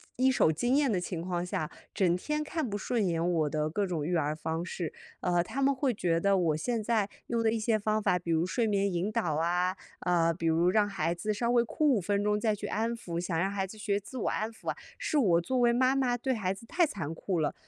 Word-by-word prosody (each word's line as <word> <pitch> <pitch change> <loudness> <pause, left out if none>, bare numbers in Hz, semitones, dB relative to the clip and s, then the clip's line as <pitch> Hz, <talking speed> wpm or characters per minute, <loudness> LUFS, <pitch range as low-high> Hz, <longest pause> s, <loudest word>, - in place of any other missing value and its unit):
一 260 +1 +3
手 160 - +4
经 240 - +1
验 280 -4 +3
的 185 - +1
情 175 -1 -4
况 175 0 -2
下， 155 -3 -2 0.2
整 180 -4 +2
天 300 +10 -2
看 310 -3 -2
不 205 - -2
顺 220 0 0
眼 170 0 0
我 155 -3 +1
的 155 +1 -1
各 200 +5 0
种 165 -5 -2
育 175 +1 0
儿 150 -1 0
方 160 +2 -3
式。 170 -2 -4 0.3
呃， 175 -1 +2
他 275 - -4
们 275 +1 +4
会 260 -2 +1
觉 170 -4 +1
得 200 +1 +3
我 160 -4 +1
现 235 +5 -1
在 215 -2 +1 0.2
用 230 -1 0
的 220 - +3
一 225 - -1
些 215 0 +2
方 215 +1 0
法， 180 - +2
比 170 -1 -4
如 165 +1 +2
睡 230 +5 0
眠 200 -1 +1
引 180 +4 -1
导 165 -7 0
啊， 180 +3 +1 0.3
呃， 170 -2 +2
比 165 0 -3
如 165 +2 +3
让 205 +1 +3
孩 185 -4 -1
子 210 +5 -2
稍 235 +3 0
微 240 -1 +4
哭 300 +6 0
5 215 - +2
分 200 +3 0
钟 210 0 +1
再 215 -1 +1
去 205 0 -5
安 225 +2 -1
抚， 170 -7 -5
想 175 -2 -2
让 190 +4 +1
孩 195 -1 -2
子 215 - -11
学 205 -1 0
自 255 +6 -10
我 - - 0
安 215 +1 -1
抚 225 - -7
啊， - - -1 0.2
是 305 - -1
我 175 -10 +4
作 255 +9 -1
为 240 -1 +4
妈 255 +2 +3
妈 250 -3 +1
对 260 +2 -1
孩 195 -5 -1
子 205 +4 -12
太 345 +7 +2
残 165 - -4
酷 175 +1 -2
了。 150 -2 0
200 Hz, 280 characters per minute, -30 LUFS, 170-230 Hz, 0.3 s, 手